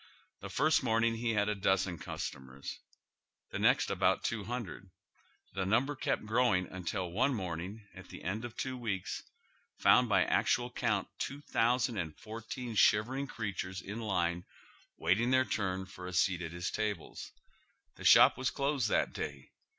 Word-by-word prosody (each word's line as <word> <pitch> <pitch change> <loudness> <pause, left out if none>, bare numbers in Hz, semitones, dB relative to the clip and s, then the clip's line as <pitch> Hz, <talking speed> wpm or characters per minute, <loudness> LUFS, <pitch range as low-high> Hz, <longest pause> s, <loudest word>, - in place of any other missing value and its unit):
The - - -7
first 155 +1 +3
morning 115 -2 +2
he 115 -1 0
bad 105 0 +2
a'dozen 95 -4 +1
customers, 65 -1 -6 0.7
tlie - - -2
next - - +3
about - - +2
two 115 -3 -1
Imndred. 100 -5 -5 0.6
The 95 - -1
number 120 +9 +1
kept 130 - -1
growing 110 -5 +2
until 90 0 -4
one 130 +8 +2
morning, 95 +2 -5
at 90 +1 -12
the - - -10
end 105 +5 -2
of 120 -1 -7
two 130 -1 -2
weeks, 110 -7 -3 0.6
found 125 -1 +5
by 95 -3 +4
actual 120 0 +1
count 105 -7 0
3,014 115 - -2
shivering 120 +7 +3
creatures 95 -6 -4
in 105 +4 -6
line 90 -5 0 0.5
waiting 100 +9 +2
their 130 0 +4
turn 95 -5 -2
for 90 -1 -9
a 90 - -6
seat 90 0 +2
at 80 -2 -5
his 90 +1 -3
tables. 105 -6 -4 0.7
The - - -10
shop - - +7
was 130 - +1
closed 140 -5 0
tliat - - +1
day. 70 -2 -6
105 Hz, 150 wpm, -32 LUFS, 90-120 Hz, 0.7 s, shop